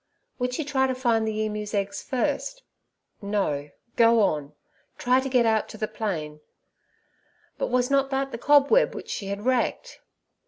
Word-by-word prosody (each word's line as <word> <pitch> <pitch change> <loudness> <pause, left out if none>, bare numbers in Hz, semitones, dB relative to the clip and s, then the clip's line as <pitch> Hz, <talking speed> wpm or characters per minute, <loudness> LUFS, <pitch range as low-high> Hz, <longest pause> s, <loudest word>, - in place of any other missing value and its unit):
Would 250 0 -1
she 315 - -2
try 265 -2 +1
to 260 - -1
find 230 -3 +1
the 215 0 -2
emu's 210 0 -4
eggs 200 0 -2
first? 300 - -2 0.6
No, 195 -9 -1 0.3
go 230 0 +5
on; 150 -7 0 0.4
try 250 +1 +3
to 270 +1 -3
get 250 -2 +3
out 220 -1 +1
to - - -9
the 215 - -2
plain. 155 -10 -4 1.2
But - - 0
was 250 +1 +1
not 275 -1 +3
that 270 0 -1
the 230 - -6
cobweb 290 - +4
which - - -7
she 195 - -4
had 200 +2 -5
wrecked? 260 - -1
235 Hz, 165 wpm, -25 LUFS, 205-265 Hz, 1.2 s, go